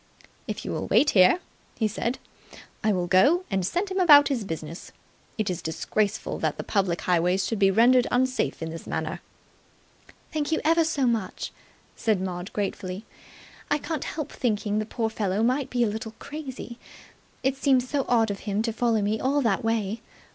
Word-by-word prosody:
"If - - -5
you - - -3
will - - -3
wait 295 - +4
here," 185 - +6 0.4
he 220 - +2
said, 235 +4 -2 0.7
"I 215 - +3
will 180 -3 0
go 280 - +4
and 190 -1 +1
send 360 - -1
him 380 - -1
about 295 -5 +8
his 255 -6 -1
business. 165 -2 -7 0.5
It 215 -2 -1
is 180 -3 -2
disgraceful 200 +5 -2
that - - -1
the - - -4
public 190 -4 0
highways 180 +2 +2
should 220 +1 -2
be 195 -1 +5
rendered 240 +5 +5
unsafe 255 -7 0
in 160 - -4
this 165 - -8
manner." - - -3 1.1
"Thank 305 -1 -1
you 320 - +2
ever 330 +1 +4
so 295 -4 0
much," 225 -6 -1 0.4
said 220 -4 +1
Maud 180 0 -4
gratefully. 195 -1 -4 0.6
"I 295 - +3
can't 310 -1 -4
help 305 -3 -4
thinking 210 -3 -1
the 215 - -3
poor 225 0 -1
fellow 210 -1 -1
may 255 +4 +2
be 245 -1 0
a - - +2
little 220 +1 -5
crazy. 275 -5 -8 0.6
It 265 +1 +1
seems 265 -2 +2
so 280 0 -1
odd 225 -3 +3
of 200 - -5
him 205 +2 0
to 230 -1 -1
follow 230 -2 +1
me 215 +2 0
all 280 +2 +1
that 225 -3 +1
way. 225 -1 -1
225 Hz, 185 wpm, -26 LUFS, 195-265 Hz, 1.1 s, about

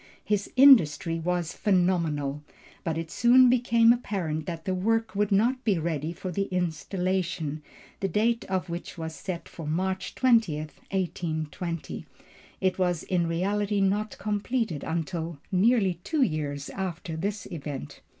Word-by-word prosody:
His 205 -1 0
industry 175 - +6
was 175 0 -1
phenomenal, 165 -7 +1 0.4
but 165 -2 -1
it 165 -1 -5
soon 250 +1 +6
became 235 -2 +5
apparent 175 -10 -3
that 165 -2 -5
the 190 - 0
work 225 +2 0
would 205 +1 +1
not 240 +6 +2
be 205 -5 +2
ready 160 -1 -2
for 180 +2 -6
the 195 +3 -1
Installation, 180 -3 -2 0.4
the 195 - 0
date 230 +4 +1
of 190 -1 -2
which 170 +1 -6
was 160 -1 -5
set 175 +1 -6
for 165 -3 -8
March 190 +4 -2
20, 230 - +3
1820. 165 0 -4 0.5
It 185 0 0
was 175 -3 +1
in 175 -2 0
reality 200 +4 0
not 200 +2 0
completed 210 - -2
until 165 0 -3
nearly 195 -2 +3
two 310 -4 +1
years 145 - -2
after 180 -3 -4
this 200 +4 -3
event. 145 - -6
185 Hz, 140 wpm, -27 LUFS, 165-205 Hz, 0.5 s, industry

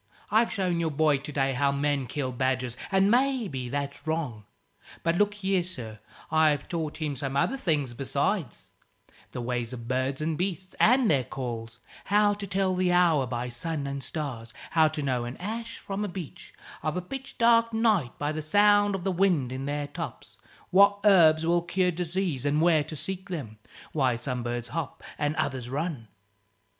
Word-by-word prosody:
I've 225 +2 +4
shown 180 -3 0
your 165 -1 +1
boy 150 -1 +2
to 150 +2 -7
day 135 -2 +1
how 140 +2 +2
men 140 -1 0
kill 130 0 -3
badgers, 125 -1 -1 0.2
and 195 +1 +4
maybe 235 - +1
that's 140 +3 -4
wrong. 145 -10 -2 0.6
But 165 +1 +2
look 205 +2 +2
here, 195 -2 +1
sir 120 -12 -7 0.3
I've 155 -3 +3
taught 160 -3 -3
him 150 -3 -2
some 135 +1 -3 0.2
things 150 - 0
besides; 140 - -2 0.6
the 125 - -5
ways 120 0 -2
of 115 -2 -7
birds 130 +2 -1
and 155 +1 -2
beasts, 185 0 -3
and 250 +1 +5
their 135 -4 +3
calls; 115 -3 -6 0.3
how 205 +1 +4
to 205 -1 -6
tell 190 0 +1
the 180 0 +2
hour 170 -7 +4
by 120 0 -3
sun 140 +5 -4
and 140 0 -4
stars; 130 -7 -5 0.2
how 160 -1 +5
to 155 -1 -3
know 130 -3 0
an 120 +2 -6
ash 230 +4 -5
from 195 +1 -4
a - - -1
beech, 180 -5 -8 0.3
of 155 +2 -2
a - - -1
pitch 270 +8 -8
dark 230 -1 +4
night, 220 - +1
by 145 +1 -1
the 155 0 -3
sound 205 +4 +4
of 185 - -5
the 190 - 0
wind 175 -9 +2
in 130 +1 -4
their 145 0 -2
tops; - - -6 0.3
what 200 +2 +6
herbs 165 -5 +6
will 170 +1 +3
cure 180 +1 +1
disease 175 -4 -2
and 145 +1 +1
where 160 -2 +4
to 155 - -7
seek 190 +5 -5
them; 115 - -6 0.3
why 130 -5 +2
some 125 +1 -3
birds 120 0 -3
hop 160 +2 -5 0.2
and 145 +1 0
others 130 -5 -2
run. 140 -4 -3
155 Hz, 180 wpm, -27 LUFS, 130-190 Hz, 0.6 s, what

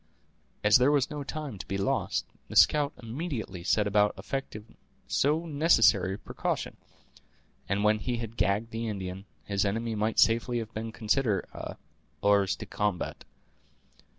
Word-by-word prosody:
As 105 0 +7
there 125 +2 +4
was 145 -3 +2
no 145 -1 -4
time 140 -7 -6
to - - -6
be 95 - -2
lost, 100 - 0 0.2
the - - -9
scout 145 -1 +5
immediately 115 - -5
set 105 +3 +2
about 105 0 +3
effecting 115 -5 -6 0.3
so 155 +4 +1
necessary 115 - +4
a - - -8
precaution; - - -3 0.9
and 100 +1 +1
when 105 0 +3
he 120 +2 -2
had 115 -1 -6
gagged 105 +2 0
the 115 +1 -3
Indian, 95 -2 -5 0.2
his 100 -1 0
enemy 115 +3 -1
might 110 +1 -1
safely 115 +2 +3
have 115 -1 -5
been 110 +1 -4
considered 110 -2 0
as - - -6 0.5
"hors 100 -1 +3
de - - -8
combat." 105 -4 -2
110 Hz, 150 wpm, -29 LUFS, 100-125 Hz, 0.9 s, As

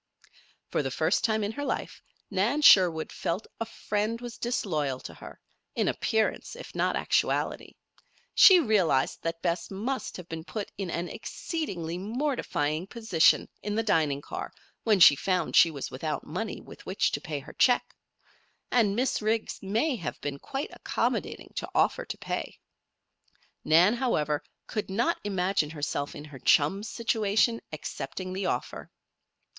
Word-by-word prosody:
For - - 0
the - - -2
first - - +1
time 220 -1 +1
in 205 - -1
her 285 +5 -5
life 270 - -3 0.3
Nan 235 +11 +1
Sherwood 175 - +6
felt 185 +6 -2
that - - -20
a 230 - -1
friend 215 +1 -2
was 240 -1 -8
disloyal 155 - -1
to - - -8
her - - -12 0.4
in - - +1
appearance, 220 -1 0
if - - -10
not - - +1
actually. - - 0 0.6
She 375 -2 +9
realized 195 - +2
that 165 0 -4
Bess 170 0 -1
must 235 +7 -3
have 180 -2 -9
been 165 -1 -6
put 205 +4 -5
in 195 -2 -4
an 170 +1 -2
exceedingly 180 - -4
mortifying 195 - -1
position 220 -8 +3
in 210 0 -3
the 225 - +1
dining 155 -9 +1
car - - -6 0.3
when 215 -4 +4
she 150 -4 +9
found 180 +2 -1
she 170 - +8
was 145 -4 -6
without 150 +4 -3
money 190 +7 -4
with - - -13
which 190 - 0
to - - -2
pay 160 -5 -4
her 135 - -9
check; 245 -1 +3 0.8
and 215 -5 +3
Miss 255 +1 0
Riggs 220 +1 -1
may 225 +10 0
have 170 -7 -5
been 140 -1 -4
quite 270 - -4
accommodating - - -2
to - - -3
offer - - +2
to - - -6
pay. - - -4 1.0
Nan, 175 +7 +5
however, 155 - 0 0.2
could 215 -3 -4
not 235 - +1
imagine 190 -5 0
herself 145 -2 -3
in 145 - -8
her 145 -3 -11
chum's 195 - +3
situation, 225 0 +1
accepting 185 -1 -5
the 190 0 -2
offer. 125 - -3
195 Hz, 155 wpm, -28 LUFS, 160-225 Hz, 1.0 s, She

